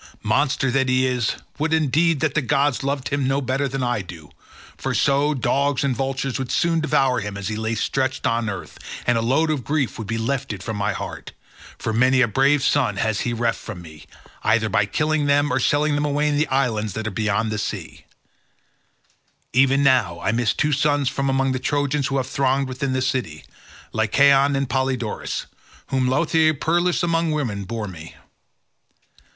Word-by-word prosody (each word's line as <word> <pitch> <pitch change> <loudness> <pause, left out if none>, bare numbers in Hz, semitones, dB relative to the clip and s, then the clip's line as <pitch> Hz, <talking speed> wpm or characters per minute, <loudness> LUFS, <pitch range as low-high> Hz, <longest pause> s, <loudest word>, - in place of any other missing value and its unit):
Monster 130 +4 +1
that 135 0 +1
he 130 0 +3
is; 125 -3 0 0.2
would 155 +1 0
indeed 160 0 +2
that 155 -3 +1
the 155 - +1
gods 135 +1 +1
loved 140 -1 -2
him 140 -2 0
no 135 +1 +1
better 135 +1 -1
than 135 0 -3
I 120 -3 0
do, 85 -5 -11 0.4
for - - -3
so, 145 +2 +2
dogs 140 +1 +1
and 135 -3 0
vultures 135 0 -2
would 130 -2 -4
soon 170 -1 +2
devour 135 -5 +2
him 105 -2 -5
as 100 0 -4
he 110 - -3
lay 110 +1 -2
stretched 130 +4 -1
on 115 -1 0
earth, 100 -3 -7 0.3
and 120 - +3
a 115 - +1
load 140 +7 +2
of 145 -5 -2
grief 145 -4 -1
would 110 - -5
be 115 - -2
lifted 115 -5 -3
from 110 0 -4
my 100 0 0
heart, - - -7 0.4
for 110 - -3
many 130 +3 +3
a 125 - +4
brave 135 +6 +2
son 125 -10 +1
has 110 0 0
he 120 - -1
reft 115 0 -1
from 95 -6 -8
me, 80 -2 -13 0.4
either 110 0 +2
by 105 -2 +2
killing 150 +4 0
them 145 +1 +2
or 130 - +2
selling 145 +3 +2
them 145 0 0
away 145 +1 +1
in 145 - 0
the 150 +1 +1
islands 115 -6 0
that 110 +1 -4
are 110 - -2
beyond 110 +2 0
the 105 - -2
sea: - - -5 1.5
even 135 +2 +4
now 120 -11 +3
I 110 - 0
miss 115 -1 +1
two 150 - +1
sons 145 -1 +2
from 140 -1 -2
among 135 0 +1
the 130 - -1
Trojans 145 0 0
who 135 -2 -1
have 130 - 0
thronged 135 +1 0
within 130 +1 -3
the 130 0 0
city, 120 - -2 0.5
Lycaon 140 +5 +4
and 135 0 0
Polydorus, 130 -4 -2 0.4
whom 130 -1 +1
Laothoe 155 +3 +2
peeress 175 +5 +1
among 165 -1 +1
women 120 -10 -2
bore 110 +1 -4
me. 85 -3 -10
130 Hz, 190 wpm, -22 LUFS, 115-145 Hz, 1.5 s, a